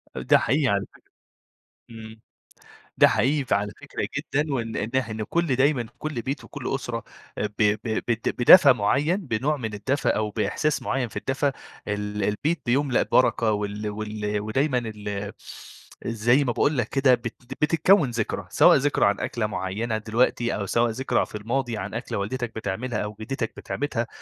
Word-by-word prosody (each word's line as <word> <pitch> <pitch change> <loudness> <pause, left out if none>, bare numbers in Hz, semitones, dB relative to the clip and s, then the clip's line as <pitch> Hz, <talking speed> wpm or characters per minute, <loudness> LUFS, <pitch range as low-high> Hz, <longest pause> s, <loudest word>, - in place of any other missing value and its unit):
أ - - -4
ده - - +5
حقيقي 140 +2 +1
علي 100 -3 +1
فكرة. - - -23 0.9
إمم. 110 -1 -11 0.8
ده - - +7
حقيقي 140 +2 +1
فعلى 105 -3 0
فكرة - - -4
جدًا 145 0 -1
وإن 115 -3 -3
إنح 115 +2 -1
إن 110 0 -4
كل 165 -4 0
دايمًا، 135 -3 +2
كل 150 -7 -4
بيت 140 +2 -4
وكل - - -5
أسرة - - -3 0.4
آآ 105 - 0
ب 105 - -10
ب 105 0 +3 0.3
بد 115 -1 0
بدفى 140 +3 +9
معيّن، 140 - +1
بنوع 145 - -1
من 110 -5 -5
الدفى 135 +8 -1
أو 105 -1 +1
بإحساس 150 +8 -1
معيّن 130 -3 -1
في - - -15
الدفى، 140 +1 0 0.4
ال 105 0 -2
البيت 145 +10 0
بيُملأ 135 +1 +2
بركة 115 -3 +2
وال 105 0 -3
وال 105 0 -3
ودايمًا 130 +6 0 0.2
ال 105 -1 -5 0.7
زي 120 +5 +2
ما 120 - 0
باقول 140 +4 +1
لك 120 -2 0
كده 135 -2 +4
بت 120 -1 -5 0.3
بتتكوّن 160 -1 +4
ذكرى، 115 -2 -3
سواء - - +6
ذكرى 145 -3 +2
عن 100 0 +1
أكلة 110 -3 -1
معيّنة 105 +3 -2
دلوقتي 120 +2 +1
أو 100 -1 -3
سواء 115 +3 +2
ذكرى 130 +4 0
في - - -18
الماضي 115 +2 -2
عن 100 +3 -5
أكلة 120 -3 -4
والدتك 120 +3 -3
بتعملها 110 +2 -3
أو 105 0 -4
جِدّتك 115 0 -3
بتعملها. 125 -5 -3
115 Hz, 170 wpm, -25 LUFS, 105-135 Hz, 0.9 s, بدفى